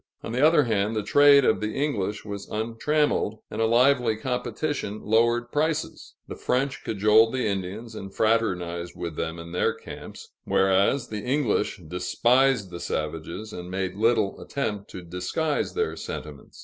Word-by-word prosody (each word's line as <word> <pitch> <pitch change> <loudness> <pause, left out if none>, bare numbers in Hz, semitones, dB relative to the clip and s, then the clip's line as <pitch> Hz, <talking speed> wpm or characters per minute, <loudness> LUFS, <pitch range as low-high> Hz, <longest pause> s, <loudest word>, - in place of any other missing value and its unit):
On - - -5
the 125 +4 +1
other 155 -1 +6
hand, 110 -2 0
the 105 - -1
trade 145 +2 +6
of - - +3
the 105 0 -2
English 105 -9 -2
was 100 -1 -6
untrammeled, 115 +2 0
and - - -3
a 110 - +3
lively 120 -1 +3
competition 125 -1 -3
lowered 120 +2 +2
prices. 155 +1 -2
The - - -6
French 135 +1 -1
cajoled 110 +3 +4
the 130 - 0
Indians, 100 +3 -3
and 95 0 -7
fraternized 90 -7 0
with 85 -3 -5
them 80 +2 -3
in 85 0 -9
their 90 - +1
camps; - - -10
whereas, 95 +7 +2
the 105 -1 -4
English 125 -6 0
despised 120 - +2
the 85 - -6
savages, 80 +8 -4
and 90 0 -7
made 95 0 -2
little 110 -1 +1
attempt 105 -8 -3
to 90 - -8
disguise 90 - -2
their 440 0 -1
sentiments. - - -8
110 Hz, 155 wpm, -25 LUFS, 95-125 Hz, -, other